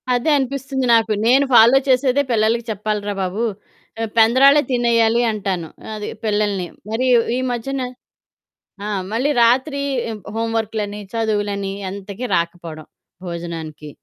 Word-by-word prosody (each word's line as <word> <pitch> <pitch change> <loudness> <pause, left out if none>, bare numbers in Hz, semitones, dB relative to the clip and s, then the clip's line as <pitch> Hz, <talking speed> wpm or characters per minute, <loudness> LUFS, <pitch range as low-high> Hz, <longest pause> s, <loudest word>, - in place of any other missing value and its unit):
అదే 245 +6 0
అనిపిస్తుంది 270 0 -2
నాకు. 225 -1 +2 0.2
నేను 270 +4 +5
ఫాలో 235 +3 +7
చేసేదే 260 +1 +3
పిల్లలకి 225 +1 +2
చెప్పాలి 210 0 -2
రా - - -1
బాబు. 190 +5 -2 0.6
రేపు 225 -2 -3
పెందరాలే 265 +6 +6
తినేయాలి 235 -1 +3
అంటాను. 190 -5 -3 0.3
అది 210 -1 -5 0.2
పిల్లల్ని. 205 -4 0 0.2
మరి 225 +4 -1
ఈ 240 - +7 0.2
ఈ - - -1
మధ్యన 265 +3 -3 1.0
ఆహ్, 205 -3 -2
మళ్ళీ 245 +6 0
రాత్రి 260 +5 +2 0.5
హోంవర్కులని 220 -2 -2
చదువులని 205 -3 -1 0.2
ఎంతకి 200 +4 -7
రాకపోవడం, 170 -2 -3 0.4
భోజనానికి. 165 -3 -6
220 Hz, 120 wpm, -20 LUFS, 200-245 Hz, 1.0 s, ఫాలో